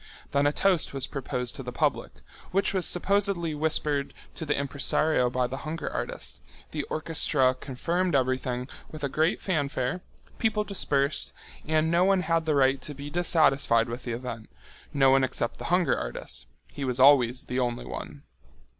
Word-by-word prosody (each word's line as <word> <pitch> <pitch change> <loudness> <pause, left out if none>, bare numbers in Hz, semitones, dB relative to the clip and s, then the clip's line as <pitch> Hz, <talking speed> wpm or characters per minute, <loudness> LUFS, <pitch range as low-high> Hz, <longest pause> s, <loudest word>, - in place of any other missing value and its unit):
Then 140 0 +3
a - - +3
toast 180 -3 +1
was 135 -1 -1
proposed 125 -3 -4
to - - -6
the 125 -1 -6
public, - - 0 0.4
which 195 +1 +1
was 185 -2 +2
supposedly 195 -3 +1
whispered 150 -2 0 0.2
to 160 - -6
the 145 - +1
impresario 140 -1 +2
by 125 0 0
the 130 +2 -4
hunger 155 +3 -5
artist, - - -4 0.3
the 155 - -2
orchestra 150 -4 +2
confirmed 170 +7 -2
everything 130 -1 0 0.2
with 155 -1 -9
a 140 - 0
great 160 +5 +1
fanfare, 145 -3 -1 0.4
people 220 -2 +1
dispersed, 145 -8 -1 0.3
and 155 +1 +2
no 170 +1 +4
one 195 0 +3
had 165 -2 0
the 155 - +2
right 135 -1 +3
to 150 - -7
be 140 +2 -8
dissatisfied 140 -9 +3
with 120 +2 -6
the 120 - -4
event, 115 -2 -6 0.4
no 135 -2 +4
one 135 0 +4
except 125 -2 -2
the - - -6
hunger 180 0 +2
artist—he - - -7
was 125 -1 -1
always 130 -2 +5
the 125 - -3
only 120 -1 -1
one. - - -7
140 Hz, 165 wpm, -27 LUFS, 130-165 Hz, 0.4 s, always